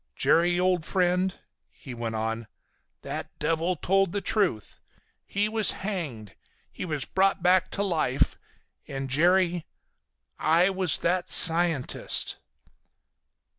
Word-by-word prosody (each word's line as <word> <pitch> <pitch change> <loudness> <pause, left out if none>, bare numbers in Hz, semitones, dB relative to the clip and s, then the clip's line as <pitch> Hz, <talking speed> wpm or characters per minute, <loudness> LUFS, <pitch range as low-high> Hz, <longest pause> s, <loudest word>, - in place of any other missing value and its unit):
Jerry, 175 +1 +2
old 180 -2 +1
friend," 180 +2 0 0.3
he 130 - -11
went 115 -1 -4
on, 115 0 -3 0.6
"that - - -6
devil 165 +3 0
told 195 +2 +1
the 205 - 0
truth. 195 - -1 0.5
He 205 +1 0
was 220 0 +2
hanged. 155 - -5 0.4
He - - -6
was 155 -5 -2
brought 190 -1 +1
back 185 0 +3
to 200 - -2
life; 155 -9 0 0.5
and 135 -1 -5
Jerry—I 175 +1 0
was 185 -3 0
that 180 +1 -1
scientist!" 165 -5 +2
175 Hz, 110 wpm, -26 LUFS, 150-185 Hz, 0.6 s, back